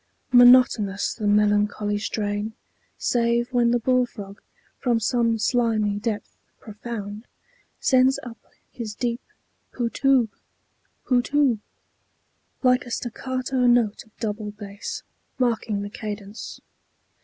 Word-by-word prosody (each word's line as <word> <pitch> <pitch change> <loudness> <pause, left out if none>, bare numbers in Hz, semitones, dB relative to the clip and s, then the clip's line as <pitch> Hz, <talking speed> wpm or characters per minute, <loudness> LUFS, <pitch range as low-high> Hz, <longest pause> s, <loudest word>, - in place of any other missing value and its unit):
Monotonous 245 -5 +5
the 215 -3 -3
melancholy 205 0 +2
strain, 205 +1 -2 0.4
Save 235 +1 +1
when 240 -1 +3
the 240 - +3
bull 250 +1 +2
frog, 200 -3 -10 0.4
from 240 -3 +1
some 230 +1 +1
slimy 215 -3 +1
depth 215 -1 -4 0.2
Profound, 210 0 -7 0.5
sends 260 0 +4
up 235 -2 -9 0.3
his 230 -5 -6
deep 240 +1 -2 0.5
"Poo 235 -2 -2
toob!" 265 -4 +3 0.8
"Poo 250 -2 +3
toob!" 275 -3 +2 1.0
Like 250 0 +3
a - - -7
staccato 255 +2 -2
note 240 -3 +3
of 220 - -28
double 210 -1 -3
bass 205 -1 -7 0.3
Marking 225 -5 0
the 205 - -5
cadence. 210 0 -7
230 Hz, 110 wpm, -24 LUFS, 210-245 Hz, 1.0 s, Monotonous